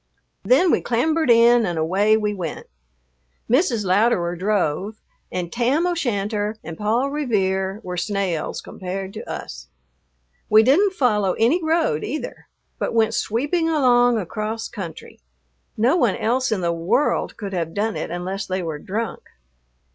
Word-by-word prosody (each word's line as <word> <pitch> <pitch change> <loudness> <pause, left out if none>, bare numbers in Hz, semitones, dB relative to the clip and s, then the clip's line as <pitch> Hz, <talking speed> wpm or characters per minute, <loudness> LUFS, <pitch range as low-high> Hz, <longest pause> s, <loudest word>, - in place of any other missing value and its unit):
Then 320 +8 +4
we - - +2
clambered 315 +5 0
in 235 0 +6
and 175 -5 -2
away 195 +7 +2
we 210 -1 -1
went. 175 -6 -5 0.8
Mrs. 245 - +2
Louderer 185 -2 +2
drove, 195 +1 -1 0.3
and 175 -2 -4
Tam 255 +8 +1
O'Shanter 215 - -1
and 165 - -7
Paul 230 +8 0
Revere 195 -8 -1
were 180 -1 -5
snails 190 -3 -2
compared 190 +1 -6
to - - -8
us. - - -7 0.8
We 215 +1 +7
didn't 365 - +4
follow 210 - +1
any 280 +11 +2
road 320 - +1
either, 295 +7 -5 0.3
but - - -2
went 225 0 +3
sweeping 295 +11 0
along 245 -6 +4
across 215 +3 -4
country. 170 -6 -9 0.6
No 240 +9 +3
one 240 - +2
else 250 +2 0
in 205 -4 0
the 170 -1 0
world 170 - 0
could 200 -3 -6
have 165 -2 -3
done 215 +1 -1
it - - -4
unless 185 +3 -4
they 185 0 -2
were 160 -3 -4
drunk. 220 +8 -4
215 Hz, 145 wpm, -22 LUFS, 185-245 Hz, 0.8 s, We